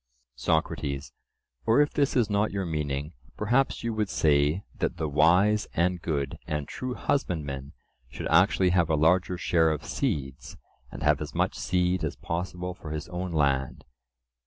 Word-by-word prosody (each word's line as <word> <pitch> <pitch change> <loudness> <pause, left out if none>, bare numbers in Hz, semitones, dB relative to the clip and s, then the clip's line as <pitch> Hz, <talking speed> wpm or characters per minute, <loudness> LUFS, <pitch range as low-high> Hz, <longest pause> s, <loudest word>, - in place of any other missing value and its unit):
SOCRATES: 70 -3 -1 0.5
Or, 115 - +5
if 145 0 +3
this 140 -2 +1
is 120 -4 +3
not 105 +1 +1
your 100 -1 -3
meaning, 75 -2 -3 0.2
perhaps 120 +6 +1
you 115 -1 -1
would 105 -2 -1
say 75 +4 +2 0.2
that - - -1
the 80 - -1
wise 90 +9 +3
and 90 +1 +1
good 70 -5 -2
and 75 -2 -2
true 125 -1 -5
husbandman 75 - -2 0.4
should 70 - -7
actually 90 +2 +4
have 85 -2 +2
a 80 - +3
larger 90 +4 +2
share 80 -2 +2
of 80 -2 -3
seeds, 70 -2 -3 0.3
and - - -7
have - - +3
as - - -6
much - - +1
seed 90 0 0
as - - -2
possible 90 +1 -4
for 85 -3 -10
his 75 -1 -5
own 90 0 -4
land? 70 -4 0
85 Hz, 160 wpm, -27 LUFS, 75-95 Hz, 0.5 s, Or